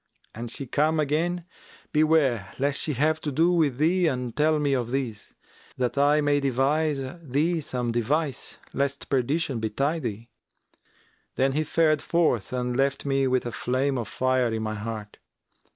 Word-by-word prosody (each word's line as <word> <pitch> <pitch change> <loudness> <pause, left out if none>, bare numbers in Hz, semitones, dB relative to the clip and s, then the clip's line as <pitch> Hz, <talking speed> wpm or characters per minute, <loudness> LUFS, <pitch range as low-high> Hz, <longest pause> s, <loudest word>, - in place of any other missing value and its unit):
An 120 +2 -6
she 135 +4 -3
come 155 +5 +1
again, 165 +4 0 0.5
beware 150 -9 +2
lest 140 +1 0
she 150 - -1
have 155 +4 +1
to 150 - -3
do 165 +6 +3
with 155 -7 +2
thee 170 +4 +3
and 125 -5 -2
tell 155 +1 +3
me 145 -2 +1
of 120 -3 -1
this, 125 -5 -4 0.4
that 125 -2 -1
I 145 +2 +4
may 145 -1 +2
devise 140 +2 +1 0.2
thee 160 +4 0
some 125 -4 -2
device 135 +4 -1 0.2
lest 140 0 -2
perdition 135 0 0
betide 135 +9 -1
thee.' 115 0 -5 1.1
Then 135 +1 +2
he 155 +3 0
fared 155 -2 +2
forth 160 - +1
and 125 -1 -2
left 135 +2 0
me 135 -1 +2
with 130 -1 +1
a 120 - -3
flame 130 +3 0
of 115 - -4
fire 130 +3 +1
in 110 0 -2
my 110 0 -2
heart. 105 -1 -6
135 Hz, 165 wpm, -26 LUFS, 125-155 Hz, 1.1 s, I